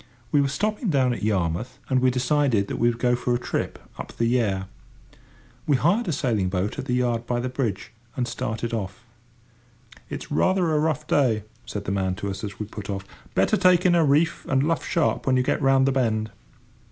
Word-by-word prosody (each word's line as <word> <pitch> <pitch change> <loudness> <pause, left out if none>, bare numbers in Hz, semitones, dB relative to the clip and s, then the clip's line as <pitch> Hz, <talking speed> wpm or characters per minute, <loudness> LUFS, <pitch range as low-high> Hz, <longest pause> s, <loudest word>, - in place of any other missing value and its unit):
We 145 - +4
were 140 - +2
stopping 210 - -1
down 130 -5 +2
at - - -6
Yarmouth, 105 +4 -1
and 130 - +2
we 130 - +4
decided 125 -4 +1
we 120 - +2
would 115 - -3
go 125 +1 +2
for 120 0 0
a - - -1
trip - - -3 0.2
up - - -7
the 115 - +1
Yare. 110 -6 +1 1.0
We 145 - +4
hired 195 - +2
a - - +1
sailing 120 - 0
boat 95 +2 -2
at - - -4
the 125 -2 0
yard 120 -2 0
by 120 -1 0
the 125 +1 -2
bridge, 125 -7 -3 0.3
and 125 -2 0
started 115 0 -3
off. 110 +2 -4 1.1
"It's - - -7
rather 180 +2 +2
a 150 - +3
rough 150 -1 0
day," 125 -8 +2 0.2
said 105 -3 -5
the - - -2
man 95 -2 0
to 100 0 -4
us, 95 +2 -7
as 100 -2 -5
we 105 - -4
put 105 0 -9
off: 100 -1 -3 0.3
"better - - +3
take 180 -1 +4
in 180 - +5
a 170 -1 +4
reef 150 +3 +2
and 135 0 +2
luff 165 +2 0
sharp 165 -4 0
when 130 -1 +4
you 125 - +2
get 140 - 0
round 135 -1 +4
the 135 - +3
bend." 110 -4 0
125 Hz, 215 wpm, -24 LUFS, 110-145 Hz, 1.1 s, in